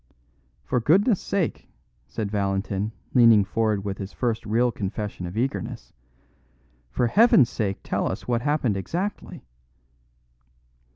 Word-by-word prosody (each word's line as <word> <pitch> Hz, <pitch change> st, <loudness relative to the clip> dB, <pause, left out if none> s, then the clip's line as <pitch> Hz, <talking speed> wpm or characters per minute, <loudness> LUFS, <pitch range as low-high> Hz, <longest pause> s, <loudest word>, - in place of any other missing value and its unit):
"For 125 Hz, -, 0 dB
goodness' 190 Hz, -, +3 dB
sake," 190 Hz, -5 st, -2 dB, 0.4 s
said 105 Hz, -3 st, -4 dB
Valentin, 100 Hz, 0 st, -1 dB, 0.2 s
leaning 115 Hz, -5 st, +6 dB
forward 105 Hz, -1 st, -1 dB
with 100 Hz, -1 st, -4 dB
his 100 Hz, -1 st, -6 dB
first 115 Hz, -3 st, -2 dB
real 120 Hz, +3 st, +2 dB
confession 100 Hz, -3 st, -5 dB
of 90 Hz, +5 st, -7 dB
eagerness, 130 Hz, +4 st, -3 dB, 1.0 s
"for 120 Hz, -, 0 dB
Heaven's 145 Hz, -, +5 dB
sake 100 Hz, -4 st, -2 dB
tell -, -, -1 dB
us -, -, -7 dB
what 120 Hz, -1 st, 0 dB
happened 135 Hz, -7 st, 0 dB
exactly." 180 Hz, -, -4 dB
115 Hz, 120 wpm, -24 LUFS, 100-130 Hz, 1.0 s, leaning